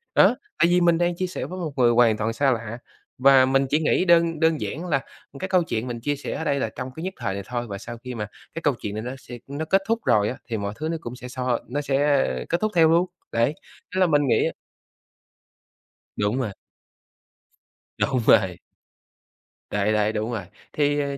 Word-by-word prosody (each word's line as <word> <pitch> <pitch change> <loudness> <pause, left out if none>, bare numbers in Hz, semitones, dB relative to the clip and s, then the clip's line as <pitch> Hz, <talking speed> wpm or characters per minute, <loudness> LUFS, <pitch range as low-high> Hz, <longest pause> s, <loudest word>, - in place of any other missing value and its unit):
đó, - - +6 0.2
tại 170 - +5
vì 180 0 +4
mình 170 -1 +4
đang 175 0 +1
chia 185 +1 -2
sẻ 180 - -5
với 185 +1 -6
một 165 -4 -3
người 120 -2 +5
hoàn 115 -2 +4
toàn 110 +1 -1
xa 135 +3 +2
lạ 115 -1 -3 0.4
và 135 0 +6
mình 135 +1 +2
chỉ 150 - +2
nghĩ 160 +3 +2
đơn 170 -2 +4
đơn 160 -1 +2
giản 165 +5 -4
là 145 -6 +1 0.4
cái 190 - -3
câu 185 -2 +3
chuyện 115 -7 -3
mình 120 -1 -4
chia 145 +4 0
sẻ 145 - -5
ở - - -3
đây 140 -3 0
là - - -1
trong 125 +1 -5
cái 160 - -6
nhất 190 +1 -3
thời 105 -5 -2
này 100 0 -5
thôi 120 0 -4
và 100 -2 -5
sau 115 +3 -8
khi 125 +1 -7
mà 105 -2 -4 0.3
cái 165 - -5
câu 145 -3 +2
chuyện 100 - -4
này 110 - -3
nó 125 - -4
sẽ 120 -2 -10
nó 145 +3 -4
kết 195 +4 +3
thúc 230 0 +1
rồi 105 0 +3
á, 130 - -5
thì 115 - -1
mọi 100 0 -3
thứ 155 +4 -4
nó 165 - -1
cũng 120 +1 -6
sẽ 125 - -9
xoa 125 -1 -1
nó 140 +6 -2
sẽ 140 0 +2 0.2
kết 170 - 0
thúc 215 0 +1
theo 165 -2 +6
luôn. 170 +2 +4 0.3
Đấy, 115 +5 +2 0.4
nên - - +1
là 185 - +5
mình 145 -3 +3
nghĩ - - +3 1.7
Đúng 105 +4 0
rồi. 115 -6 -2 1.5
Đúng 130 - +1
rồi. 95 -4 +5 1.1
Đấy, 105 +1 +1
đấy, 105 0 +1
đúng 110 +3 -2
rồi 110 -5 -3 0.3
thì, 145 -1 +1
ờ, 140 -1 -2
135 Hz, 225 wpm, -24 LUFS, 115-160 Hz, 1.7 s, đó